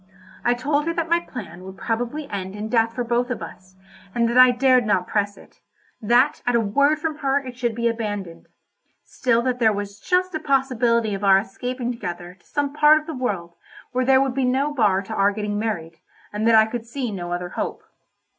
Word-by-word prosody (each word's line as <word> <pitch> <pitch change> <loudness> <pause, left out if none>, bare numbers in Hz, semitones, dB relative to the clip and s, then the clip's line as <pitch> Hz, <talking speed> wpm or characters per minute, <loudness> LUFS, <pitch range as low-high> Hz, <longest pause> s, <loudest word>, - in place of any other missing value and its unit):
I 240 - +2
told 290 +4 0
her 335 - -1
that 335 -1 -2
my 340 - +5
plan 190 - -9
would 190 0 -10
probably 245 +6 -3
end 190 -1 -5
in 210 +1 -5
death 230 -1 +1
for 245 - -1
both 240 +1 0
of 250 - -4
us, 185 0 -12 0.4
and 235 -1 +2
that 235 - -1
I 255 0 +9
dared 255 0 +3
not 185 -3 +2
press 205 0 -1
it—that 240 +6 -1
at 245 - +2
a - - +4
word 280 +8 +2
from 310 0 -3
her 275 -1 +1
it 260 -3 -5
should 240 -2 -2
be 235 0 0
abandoned; 205 -7 -4 0.6
still 235 -2 0
that 250 -1 -1
there 225 -2 +4
was 205 0 -5
just 365 +4 0
a 315 - -2
possibility 245 -6 +1
of 195 +1 -5
our 195 -1 +6
escaping 245 +5 -3
together 175 -6 -6
to - - -31
some 285 -1 -2
part 300 +1 +6
of 310 - -13
the 320 - -6
world 200 - -3 0.4
where 255 +1 0
there 265 +1 +5
would 270 -1 +1
be 270 +1 -1
no 270 +4 +1
bar 205 -7 +2
to 220 - -7
our 200 -1 +3
getting 210 0 -3
married, 170 -7 -4 0.3
and 215 +2 -1
that 230 - +6
I 220 0 +7
could 230 +1 -6
see 245 -1 -4
no 175 -3 -5
other 175 0 -3
hope. - - -4
235 Hz, 215 wpm, -22 LUFS, 205-265 Hz, 0.6 s, I